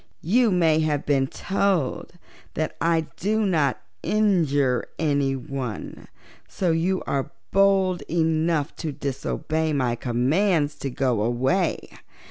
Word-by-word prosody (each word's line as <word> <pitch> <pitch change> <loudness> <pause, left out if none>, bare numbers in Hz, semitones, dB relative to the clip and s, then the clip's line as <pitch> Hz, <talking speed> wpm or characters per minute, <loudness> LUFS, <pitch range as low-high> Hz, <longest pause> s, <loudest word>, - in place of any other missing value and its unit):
You 230 +7 +3
may 165 -4 +3
have 150 -2 0
been 135 -2 +2
told 190 -5 -1 0.4
that 155 - -2
I 165 0 +3 0.2
do 215 +2 0
not 155 -9 +1 0.2
injure 155 - +1
anyone, 135 -5 -2 0.4
so 180 -3 -1
you 180 +3 0
are 135 -1 -2 0.2
bold 195 -2 +3
enough 160 -2 +1
to 160 - -3
disobey 155 +3 -2
my 125 -4 +1
commands 145 - +1
to 140 - -3
go 125 -4 0
away. 130 - 0
155 Hz, 110 wpm, -24 LUFS, 135-180 Hz, 0.4 s, You